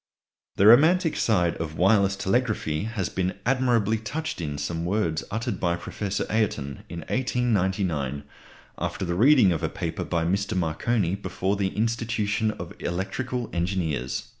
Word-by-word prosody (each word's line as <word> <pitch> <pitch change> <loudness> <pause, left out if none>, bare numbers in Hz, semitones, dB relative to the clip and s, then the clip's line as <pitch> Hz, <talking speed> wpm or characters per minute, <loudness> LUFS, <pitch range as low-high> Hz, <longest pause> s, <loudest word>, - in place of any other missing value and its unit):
The 100 - +3
romantic 160 - +6
side 90 -7 +1
of 80 -1 -5
wireless 100 +1 +4
telegraphy 100 -6 0
has 110 -5 -2
been 95 0 -2
admirably 120 -4 +2
touched 155 - -4
in 75 -3 -3
some 80 +3 -3
words 85 -4 0
uttered 110 +3 -3
by 85 -1 +1
Professor 95 +3 -3
Ayrton 75 - -1
in 85 0 -6
1899, 95 - 0 0.6
after - - -2
the 85 - -1
reading 120 0 +5
of 80 - -1
a - - 0
paper - - -4
by 85 -2 -1
Mr. 95 +2 0
Marconi 90 +3 0
before 100 0 -2
the 100 -1 0
Institution 110 -1 0
of 85 -5 -6
Electrical 115 +7 -3
Engineers. 85 -8 -1
100 Hz, 140 wpm, -25 LUFS, 85-115 Hz, 0.6 s, romantic